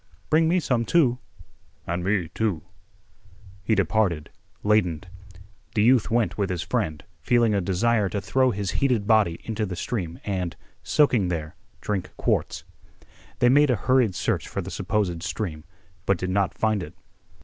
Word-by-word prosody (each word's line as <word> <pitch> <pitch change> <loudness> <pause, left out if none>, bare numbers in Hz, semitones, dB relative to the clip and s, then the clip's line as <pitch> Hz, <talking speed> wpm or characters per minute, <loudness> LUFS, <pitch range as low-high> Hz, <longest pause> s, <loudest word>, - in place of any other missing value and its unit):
"Bring 160 +1 +4
me 180 +2 +3
some, 125 -8 0
too." 125 -1 +2 0.7
"And 85 +1 -2
me, 95 -3 0
too." 95 -6 -2 1.0
He 110 - +2
departed, 95 -11 0 0.3
ladened. 100 -5 +1 0.7
The 105 - +3
youth 120 -1 +4
went 115 -2 0
with 100 -1 0
his 90 -2 -2
friend, 75 -2 -2 0.2
feeling 115 +7 +2
a 100 - +1
desire 100 +3 +1
to 100 - -2
throw 130 +6 +2
his 100 -3 -2
heated 125 -7 +2
body 105 -6 +3
into 110 -1 -3
the 95 -3 -3
stream 90 -4 -4
and, 90 -4 -2 0.3
soaking 125 -10 +3
there, 80 -3 -4 0.3
drink 95 -3 -2
quarts. - - -1 0.7
They 120 +3 +4
made 145 +2 +5
a 125 - +3
hurried 120 -1 +2
search - - -1
for - - -4
the - - -5
supposed 90 -6 -1
stream, 85 -3 -4 0.4
but 100 - +3
did 95 +1 -3
not 100 -1 0
find 110 -2 +1
it. 80 - -8
105 Hz, 160 wpm, -25 LUFS, 90-115 Hz, 1.0 s, made